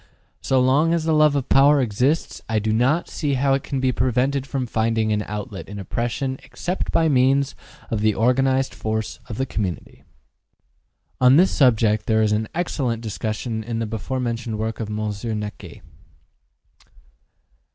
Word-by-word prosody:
So 130 - +2
long 145 +6 +3
as 165 - -1
the 160 0 +1
love 150 -1 +4
of 140 -3 -1
power 140 +2 +5
exists, 130 +6 0
I 110 - +1
do 110 +1 0
not 130 +9 +2
see 145 -3 -2
how 135 +1 +2
it 135 - +1
can 135 - -3
be 130 -1 +2
prevented 130 +2 0
from 135 -2 -2
finding 110 -1 0
an 105 - 0
outlet 105 -2 -6
in 100 - -7
oppression 120 +7 -3
except 180 +2 -4
by 165 - +3
means 135 0 +3 0.4
of 110 -2 -1
the 110 -1 +2
organized 130 +2 +2
force 110 0 -3
of 110 - -5
the 130 - 0
community. 95 -9 -5 1.2
On 130 +1 +6
this 180 +5 +5
subject 110 -5 +3
there 110 -1 +3
is 105 - +1
an 110 +1 0
excellent 130 -9 -2
discussion 110 +1 -3
in 115 +1 -4
the 115 - -1
before 110 +4 -4
mentioned 115 -2 -3
work 110 +1 -3
of 110 -2 -4
Monsieur 105 +1 -3
Naquet. 105 0 -7
120 Hz, 165 wpm, -22 LUFS, 110-135 Hz, 1.2 s, On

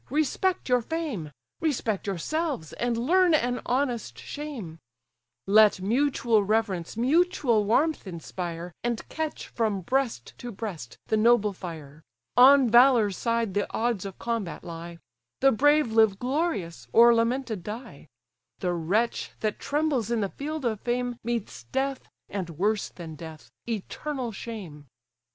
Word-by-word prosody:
respect 310 +6 0
your 250 -1 +3
fame, 260 - -4 0.3
Respect 240 - -1
yourselves, 200 - -2
and 240 -1 -1
learn 345 +7 +4
an 245 -3 0
honest 245 - -1
shame: 225 - -7 0.7
Let 210 0 +6
mutual 235 0 +2
reverence 205 -3 -1
mutual 260 - +2
warmth 285 +4 +1
inspire, 170 0 -6
And 235 -1 -2
catch 315 -1 -4
from 215 -4 -1
breast 260 +4 -1
to 245 - -6
breast 170 - -7
the 220 - +1
noble 215 -2 +4
fire, 160 -5 -9 0.3
On 265 +1 +8
valour's 235 -4 +5
side 230 -2 -1
the 205 0 -1
odds 230 -4 0
of 195 -2 -7
combat 230 -8 -3
lie; 170 0 -8 0.4
The 270 0 +5
brave 290 +1 +3
live 220 -3 +4
glorious, 245 - -2
or 235 - +7
lamented 230 -2 0
die; 215 - -8 0.5
The 180 -1 -1
wretch 195 +8 0
that 215 -1 -1
trembles 290 -7 0
in 235 -2 +1
the 200 - -1
field 300 +3 -5
of 220 -3 -1
fame, 245 0 -1
Meets 230 - -4
death, 270 - -2 0.2
and 190 -4 -4
worse 200 +6 0
than 165 -3 -9
death, 160 0 -10 0.2
eternal 245 +4 -4
shame." 190 -10 -8
230 Hz, 135 wpm, -27 LUFS, 190-265 Hz, 0.7 s, On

